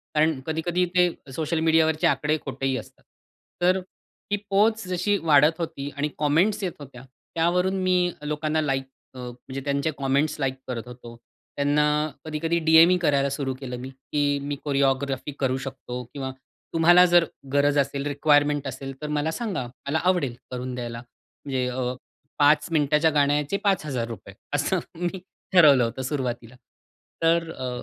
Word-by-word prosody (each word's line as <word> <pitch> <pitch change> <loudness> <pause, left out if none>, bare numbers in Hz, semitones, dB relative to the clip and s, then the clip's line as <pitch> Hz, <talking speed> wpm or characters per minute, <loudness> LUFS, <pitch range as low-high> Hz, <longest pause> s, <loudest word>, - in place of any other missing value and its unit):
कारण 155 -1 +2
कधी-कधी 170 +3 0
ते 180 -1 +5 0.2
सोशल 160 +2 -1
मीडियावरचे 160 -1 +3
आकडे 150 +1 +1
खोटेही 135 -1 -2
असतात. 110 - -11 0.6
तर 185 +2 +3
ती 200 +2 -8
पोहोच 215 +1 +2
जशी 185 +3 +1
वाढत 155 +1 +4
होती 145 -4 -4
आणि 145 - 0
कॉमेंट्स 165 +9 +2
येत 185 - -1
होत्या. 135 -3 -11 0.3
त्यावरून 180 +3 +2
मी 180 -1 +2
अ, - - -9
लोकांना 150 +1 -1
लाइक 135 -2 0 0.3
अ, - - -9
म्हणजे 125 +2 -7
त्यांचे 140 +2 0
कॉमेंट्स 140 +3 0
लाइक 135 -2 0
करत 120 -1 -5
होतो. 120 -1 -11 0.4
त्यांना 145 +1 +2 0.4
कधी-कधी 160 +2 -1
डीएम 160 +1 +6
ही 180 - +4
करायला 140 -5 +2
सुरु 135 -1 -2
केलं 125 -2 -6
मी, 130 - -7
की 145 +2 -1
मी 145 0 -3
कोरिओग्राफी 140 0 0
करू 130 -1 +1
शकतो 125 -2 -6
किंवा 135 -2 -4 0.4
तुम्हाला 175 +2 +6
जर 175 -1 +5 0.3
गरज 145 0 +3
असेल, 140 0 0
रिक्वायरमेंट 145 -1 +2
असेल 135 +1 -6
तर 150 - -4
मला 155 +2 0
सांगा. 195 - -3 0.2
मला 160 +3 +1
आवडेल 175 -10 +1 0.2
करून 125 0 -4
द्यायला. 120 -1 -5 0.5
म्हणजे 130 -3 -1
अ, 125 0 -2 0.5
5 145 0 +4
मिनिटाच्या 150 0 +3
गाण्याचे 145 +4 +1
5000 130 - -2 0.2
असं 145 +6 +1 0.2
मी 180 +2 -2 0.3
ठरवलं 145 -8 +7
होतं 115 +3 -3
सुरुवातीला. 125 -3 -4 0.7
तर 165 0 +2
अ, 130 -1 -5
145 Hz, 150 wpm, -25 LUFS, 135-165 Hz, 0.7 s, ठरवलं